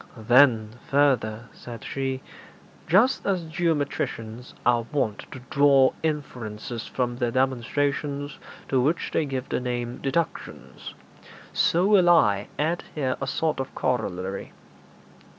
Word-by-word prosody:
'Then, 115 -1 +4 0.2
further,' 125 -6 +2
said 120 -1 -10
she, 135 -1 -3 0.6
'just 210 +10 +4
as 185 -3 +1
geometricians 145 -8 -2
are 120 -1 +2
wont 115 -8 -1
to 130 - -8
draw 140 -2 +5
inferences 120 -7 -4
from 120 -1 -2
their 120 -1 0
demonstrations 140 +3 -1 0.3
to 130 -2 +2
which 155 +7 0
they 160 - +1
give 130 -1 -4
the - - 0
name 120 -1 -3
"deductions," 150 +5 -4 0.6
so 175 +3 +3
will 195 -4 +5
I 105 - +4
add 160 +4 0
here 130 -4 0
a 135 - -2
sort 155 +2 -1
of 135 - -5
corollary. 95 -6 -2
135 Hz, 120 wpm, -25 LUFS, 120-150 Hz, 0.6 s, draw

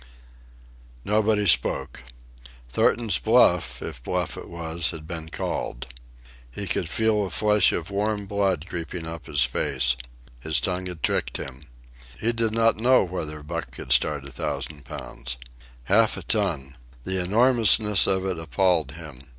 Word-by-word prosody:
Nobody 105 0 +2
spoke. 90 - +2 0.7
Thornton's 105 - +2
bluff, - - +3
if 60 - -7
bluff 90 +6 -2
it - - -9
was, 85 0 -1
had 80 -2 -7
been 80 -1 -7
called. 60 -5 -4 0.7
He 100 - -5
could 90 -3 0
feel 110 +2 +2
a 95 - -3
flush 105 +2 +4
of 85 +3 -4
warm 105 +1 -1
blood 95 -5 0
creeping 85 0 -5
up 80 0 -7
his - - +3
face. - - 0 0.4
His 80 +4 +1
tongue 90 0 -2
had 90 -3 -8
tricked - - 0
him. 65 0 -8 0.6
He 115 - +1
did 115 -1 0
not 115 0 +3
know 125 +4 +4
whether 80 -5 -5
Buck 85 +2 -5
could - - -2
start 75 -2 +1
a 70 - -9
thousand 75 +3 -5
pounds. - - -7 0.5
Half 110 - +3
a - - -7
ton! 80 - 0 0.3
The 95 +2 0
enormousness 110 0 +4
of 95 0 +1
it 95 -3 -2
appalled 80 -1 +1
him. 75 -5 -11
90 Hz, 150 wpm, -25 LUFS, 80-105 Hz, 0.7 s, flush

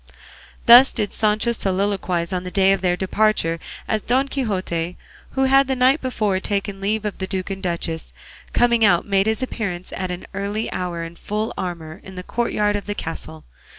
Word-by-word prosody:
'" - - -23
Thus 245 +3 +9
did 210 -4 -2
Sancho 215 +2 +1
soliloquise 190 -4 -1
on 180 -1 -1
the 180 - -5
day 195 0 +4
of 195 - -2
their 180 -1 +1
departure, 190 -4 +1 0.3
as 215 - 0
Don 260 +5 +1
Quixote, 185 -10 -2 0.4
who 265 - +1
had 270 +1 +5
the 265 - 0
night 260 +4 +4
before 215 -7 0
taken 200 0 -2
leave 215 +2 -1
of 210 - -4
the 190 - -3
duke 190 0 -3
and 195 0 -5
duchess, 170 - -3 0.4
coming 235 -1 +3
out 180 -5 +4
made 195 0 +2
his 220 +3 0
appearance 195 -8 -4
at 185 -1 -3
an 180 0 -5
early 200 +3 -2
hour 175 -2 -3
in 165 +1 -8
full 215 +2 -3
armour 170 -1 -5
in 190 - -11
the 180 - -6
courtyard 210 -2 0
of 205 - -4
the 205 - -2
castle. 120 - -6
200 Hz, 190 wpm, -22 LUFS, 180-220 Hz, 0.4 s, Thus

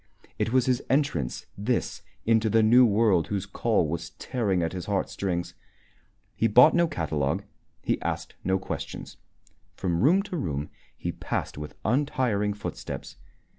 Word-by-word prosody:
It - - 0
was 130 -1 +3
his 125 -1 +1
entrance, 135 - 0
this, 115 +5 -1 0.2
into 110 -1 +3
the 110 +1 +4
new 120 +3 +7
world 100 -5 +3
whose 100 -3 -2
call - - +1
was 85 +2 -4
tearing 100 -9 0
at 80 - -2
his 90 -2 -5
heartstrings. 95 -3 -2 0.8
He 115 - +2
bought 125 +8 +7
no 170 -1 +4
catalogue, 75 - -1 0.4
he - - 0
asked - - -3
no 95 +1 +2
questions. 95 - -6 0.6
From 85 -3 -1
room 180 - +5
to 185 -3 -5
room 75 - -3 0.3
he - - -3
passed - - -3
with 75 0 -7
untiring 115 -5 +1
footsteps. 105 - -6
105 Hz, 145 wpm, -27 LUFS, 85-125 Hz, 0.8 s, new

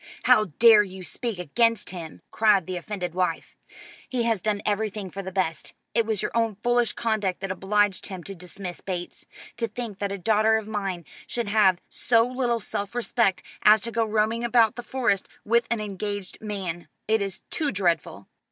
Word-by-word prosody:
"How 215 - +5
dare 225 -2 +8
you 190 -2 -6
speak 230 +2 -4
against 230 +8 +1
him!" 170 -4 -8
cried 210 -5 +4
the 185 - -4
offended 180 -1 -4
wife. 180 -2 -2 0.5
"He 250 -2 0
has 225 -4 +1
done 210 0 -1
everything 205 -2 -2
for 195 - -5
the 190 -1 -6
best. 180 -5 -2 0.2
It 230 -1 +2
was 220 -4 0
your - - -1
own 230 -2 +1
foolish 240 -2 +2
conduct 215 -5 -1
that 195 -1 -3
obliged 205 +1 +1
him 185 -3 -7
to 195 - -6
dismiss 180 0 -7
Bates. 180 -2 -5 0.3
To 235 -1 0
think 220 -2 -6
that 200 -1 -2
a 200 - -3
daughter 220 +3 +3
of 220 -1 -5
mine 195 -5 -3 0.2
should 235 -4 -3
have 200 -4 +4
so 230 -1 +3
little 245 -2 0
self 200 +1 -4
respect 235 -5 +1 0.2
as 215 +1 +7
to 235 - -3
go 230 0 +1
roaming 220 +2 0
about 235 -1 +4
the 245 - -5
Forest 240 -6 0 0.2
with 235 +2 +3
an 235 -1 0
engaged 205 -1 -5
man! 190 -5 -4 0.2
It 220 0 +2
is 195 -2 -4
too 300 -3 0
dreadful." 170 - -1
210 Hz, 185 wpm, -25 LUFS, 190-230 Hz, 0.5 s, dare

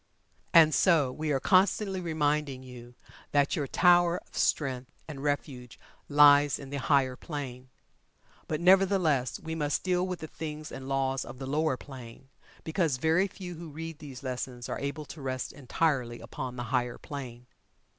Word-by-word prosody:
And 160 -2 +7
so 150 -4 +4
we 155 +3 -3
are 135 - +2
constantly 190 +3 +2
reminding 150 -5 -1
you 125 -1 -12 0.4
that 145 -1 +3
your 145 -5 -2
tower 175 +2 +4
of - - -14
strength 130 -4 0 0.2
and 145 -4 -7
refuge 140 -4 -3 0.3
lies 145 -1 +6
on 140 -1 -10
the 140 - -2
higher 135 -2 +2
plane. 130 -4 -7 0.8
But, 155 +1 -2
nevertheless, 180 -8 +3
we 160 0 -6
must 150 -2 -1
deal 180 0 +1
with 180 -1 -4
the 160 - -5
things 155 -1 -7
and 130 0 -7
laws 135 -1 0
of - - -10
the 135 - -6
lower 150 0 0
plane, 130 -1 -11 0.3
because 160 -5 0
very 160 +8 +2
few 180 -2 -8
who 170 0 -9
read 165 +1 -7
these 140 -4 -10
lessons 125 -1 -5
are - - -4
able 140 +2 -4
to 150 - -10
rest 130 -1 -3
entirely 130 -3 -1
upon 125 -1 -6
the 120 - -4
higher 125 -1 0
plane. 125 -4 -8
145 Hz, 165 wpm, -29 LUFS, 130-160 Hz, 0.8 s, And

